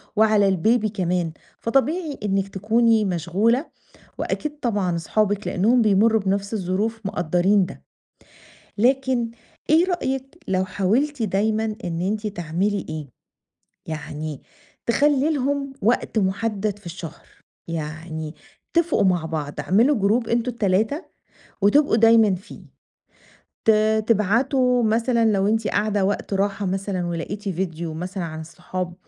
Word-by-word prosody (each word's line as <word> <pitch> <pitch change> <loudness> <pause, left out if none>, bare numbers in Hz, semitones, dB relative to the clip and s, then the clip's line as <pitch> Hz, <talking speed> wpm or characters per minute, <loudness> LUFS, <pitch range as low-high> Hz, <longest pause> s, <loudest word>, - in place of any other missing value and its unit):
وعلى 215 -2 +4
الBaby 215 +4 +2
كمان 180 -4 -1 0.3
فطبيعي 285 +6 0
إنِك 195 -1 0
تكوني 220 +2 +2
مشغولة 195 - +1 0.5
وأكيد 300 -1 -3
طبعًا 200 -7 0
اصحابِك 205 +4 0
لأنهم 230 +6 +3
بيمرّوا 215 +1 +4
بنفس 200 +2 -1
الظروف 210 +3 -1
مُقدّرين 180 +1 +2
ده. - - -11 1.0
لكن 255 0 +2 0.4
إيه 330 +4 +5
رأيِك 270 -4 -3
لو 190 0 +1
حاولتِ 225 +9 0
دايمًا 215 +2 +1 0.2
إن 170 -1 -3
أنتِ 210 +4 -1
تعملي 195 +1 -2
إيه 155 -2 -5 0.8
يعني 155 -1 -6 0.4
تخلّي 285 +4 +3
لهم 275 0 -1
وقت 225 +1 +1
مُحدد 205 +1 -1
في 200 - -20
الشهر، 170 -2 -8 0.4
يعني 160 0 -5 0.4
اتفقوا 335 -8 +2
مع 180 -4 +2
بعض 150 -3 -4
اعملوا 235 +10 +3
جروب 220 +4 +1
أنتم 235 +1 0
ال3 220 - 0 0.6
وتبقوا 280 +5 +4
دايمًا 225 -3 +5
فيه 185 +2 -10 1.1
ت 225 - +7 0.4
تبعتوا 245 +4 +2
مثلًا 230 +1 +2
لو 195 -1 +2
أنتِ 220 0 +1
قاعدة 205 -2 +1
وقت 200 0 -2
راحة 195 +1 0
مثلًا 190 -1 -2
ولقيتِ 175 +5 -4
فيديو 170 -3 -3
مثلًا 180 +3 -4
عن 160 -1 -5
الصحاب 180 +2 -6
205 Hz, 120 wpm, -23 LUFS, 180-230 Hz, 1.1 s, ت